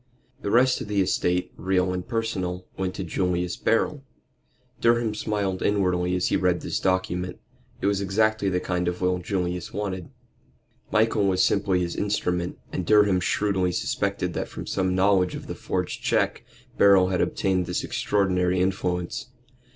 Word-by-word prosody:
The - - -3
rest 125 +4 +4
of - - -5
the 105 -1 0
estate, 90 -1 +1
real 90 0 +1
and 90 -1 -4
personal, 95 -6 -2
went 95 -1 -3
to - - -4
Julius 90 0 -1
Beryl. 135 +5 +1 0.8
Durham 115 -2 +2
smiled 105 -3 -2
inwardly 90 -3 +1
as 90 - +1
he - - +1
read 90 -1 +1
this - - -2
document. 90 -1 -1 0.4
It - - -2
was 100 0 +1
exactly 105 +1 +1
the 90 -1 0
kind 90 -1 -2
of 90 0 -2
will 90 0 +1
Julius 90 -1 -3
wanted. 95 -4 -4 0.8
Michael 110 -2 +3
was 95 -1 +3
simply 100 -3 +2
his 85 -1 -2
instrument, 90 -4 -1 0.2
and 90 - -2
Durham 105 0 +4
shrewdly 95 -1 +1
suspected - - -1
that - - -3
from - - -8
some 95 -1 0
knowledge 95 -1 +3
of - - -7
the - - -5
forged - - -3
check - - 0 0.4
Beryl 95 -2 +6
had 90 - 0
obtained 95 -3 0
this 90 - -2
extraordinary 90 -3 +1
influence. 90 0 -1
95 Hz, 160 wpm, -25 LUFS, 90-100 Hz, 0.8 s, Beryl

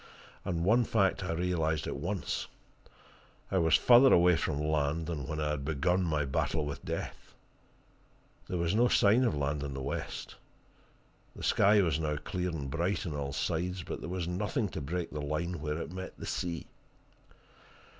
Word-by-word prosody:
And 85 -3 -1
one 115 +5 +5
fact 100 -4 +1
I 90 - -2
realized 80 -3 0
at - - -3
once 90 +7 -3 1.0
I 95 - +3
was 80 -2 +4
further 125 +2 +7
away 90 0 +6
from 75 -2 -1
land 75 +1 0
than 75 -6 -4
when 75 - -3
I 75 -1 0
had 75 -2 -3
begun 80 +5 +1
my 75 -3 0
battle 75 +3 0
with 70 -1 -5
death. - - -6 1.1
There 90 - -1
was 85 +1 0
no 120 +3 +4
sign 115 +2 +4
of 120 - +1
land 70 0 -1
in 70 -1 -4
the 65 - -4
west. 70 - -5 1.0
The - - -9
sky 100 +1 +5
was 80 -3 +1
now 75 -1 -1
clear 90 +4 -3
and 75 -5 -4
bright 85 +8 -1
on 80 - -3
all 70 -1 -3
sides, 90 +5 -2
but - - -5
there - - -5
was 90 -2 -3
nothing 105 +5 -1
to 80 - -5
break 85 +4 -3
the 75 - -4
line 75 +3 -2
where 75 0 -2
it 85 - -6
met 95 0 -7
the - - -7
sea. 85 -2 -3
85 Hz, 180 wpm, -31 LUFS, 75-90 Hz, 1.1 s, further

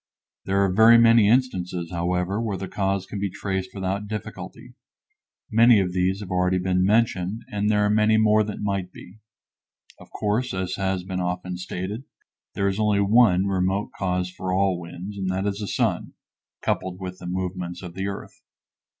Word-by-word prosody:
There 95 +1 0
are 95 - 0
very 110 +3 +7
many 115 -2 +6
instances, 90 -9 0
however, 90 +4 -1
where 105 -4 -2
the 95 +1 -5
cause 95 0 -1
can 100 - -6
be 100 0 -1
traced 95 0 -3
without 95 +2 -3
difficulty; 105 -1 -7 0.8
many 115 0 +6
of 90 -2 -1
these 95 +2 0
have 100 -2 -8
already 90 0 +2
been 90 0 +1
mentioned 105 -1 +1
and 105 0 0
there 105 -1 +3
are - - +2
many 110 +1 +3
more 110 0 +4
that 105 0 -6
might 100 -3 -2
be. 95 +4 -14 0.8
Of - - -15
course, 110 +2 -1
as 95 0 -2
has 95 -2 -1
been 95 0 -4
often 90 0 -3
stated, 95 +7 -5 0.5
there 100 - +1
is 100 +1 -1
only 105 -2 +2
one 100 -2 +4
remote 95 +1 0
cause 90 -1 -1
for 95 0 -4
all 95 -1 +1
winds, 90 +4 -8
and 95 -1 -2
that 95 +1 -1
is 100 0 -2
the 105 - -4
sun, - - -1 0.5
coupled 90 -1 -2
with 90 -1 -7
the 90 - -8
movements 90 -1 -4
of 90 -2 -8
the 95 +2 -3
earth. 100 - -7
95 Hz, 180 wpm, -24 LUFS, 90-105 Hz, 0.8 s, very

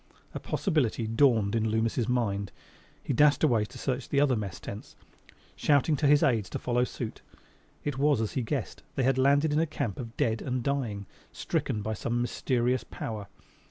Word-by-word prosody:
A - - -4
possibility 140 - 0
dawned 115 -3 +3
in 110 -1 +1
Loomis' 110 +1 0
mind. 100 -5 0 0.5
He - - -1
dashed 145 +4 +4
away 115 -8 +3
to - - -12
search 130 -2 -3
the 140 - +2
other 140 -3 +3
mess 100 -5 -4
tents, 100 - -8 0.6
shouting 150 +1 +3
to 145 - +2
his 145 0 +5
aides 110 -8 +2
to - - -3
follow 125 0 0
suit. 120 -2 -6 0.6
It 145 -3 -3
was 145 -3 +3
as 110 -2 -1
he 130 - -1
guessed: 115 - -3
they 135 - +1
had 130 +1 +2
landed 145 +3 +3
in 150 - +3
a 165 - +2
camp 140 -9 -3
of 115 -2 -7
dead 110 -1 +1
and 125 -2 -2
dying; 115 -8 -2 0.3
stricken 105 - -2
by 110 +1 -2
some 120 +3 -2
mysterious 125 +1 0
power. 105 -3 -6
120 Hz, 185 wpm, -28 LUFS, 110-140 Hz, 0.6 s, his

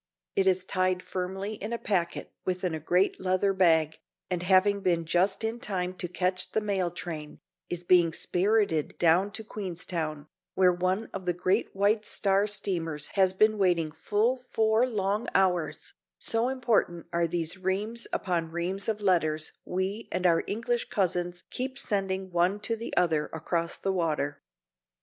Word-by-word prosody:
It 195 -1 +2
is 185 -1 +2
tied 185 -1 0
firmly 190 +3 -4
in 210 +1 -6
a 235 - -1
packet 180 -7 -2
within 180 -1 -1
a 160 - -3
great 180 +5 +1
leather 185 +1 +2
bag, 160 -4 +3 0.3
and, 180 -1 0
having 190 +2 +4
been 170 -3 +1
just 185 +6 +1
in 225 +2 -2
time 185 -4 -2
to 175 - -2
catch 180 +1 -1
the - - +3
mail 195 -4 0
train, 160 -3 -6 0.3
is 175 0 -4
being 175 -2 +5
spirited 180 -2 +1
down 175 +4 +4
to 220 - -5
Queenstown, 170 -7 -4 0.3
where 185 -1 +5
one 185 +5 -1
of 190 -2 -6
the 175 - +1
great 185 +5 0
White 205 +2 +2
Star 200 -1 +1
steamers 170 -7 -1
has 190 -2 +3
been 215 +2 +3
waiting 175 -5 +2
full 220 +10 0
four 220 +3 +2
long 205 0 -1
hours, 180 -4 +1 0.2
so 225 +1 +1
important 235 -10 0
are 170 0 +2
these 165 +1 -2
reams 205 +5 -2
upon 170 -3 -1
reams 180 +5 -2
of 215 -1 -2
letters 160 -5 +1
we 190 +5 -3
and 185 0 -1
our 170 -2 +4
English 235 +3 -1
cousins 175 -2 -1
keep 260 +1 -3
sending 190 -4 -2
one 175 +4 +2
to 230 +2 -1
the 230 +1 -6
other 160 -4 +2
across 165 +1 -2
the 195 - -1
water. 155 -5 -1
185 Hz, 160 wpm, -28 LUFS, 175-205 Hz, 0.3 s, being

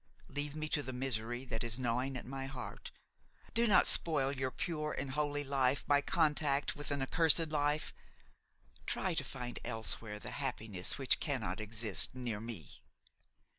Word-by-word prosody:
Now - - -18
leave 145 +1 -2
me 155 0 -2
to 150 - +1
the 130 -2 -5
misery 120 -1 -2
that 110 -2 -3
is 115 -1 +1
gnawing 125 +2 -1
at - - -7
my 135 +1 -5
heart; 135 -2 -7 0.6
do 235 +1 +4
not 200 - +6
spoil 145 -5 +4
your 130 -1 -1
pure 155 -1 -2
and 135 -1 -3
holy 145 0 -1
life 135 -1 +1
by 145 0 +4
contact 150 -3 +1
with 145 - -6
an 140 -2 0
accursed 165 +2 +5
life; 150 0 0 0.9
try - - 0
to - - +1
find 120 -1 -6
elsewhere 110 -2 -2
the - - -7
happiness 110 -9 -2
which 135 -2 +3
cannot 115 - -2
exist 110 +1 +2
near 120 -5 -3
me." 115 -8 -8
135 Hz, 165 wpm, -35 LUFS, 120-145 Hz, 0.9 s, not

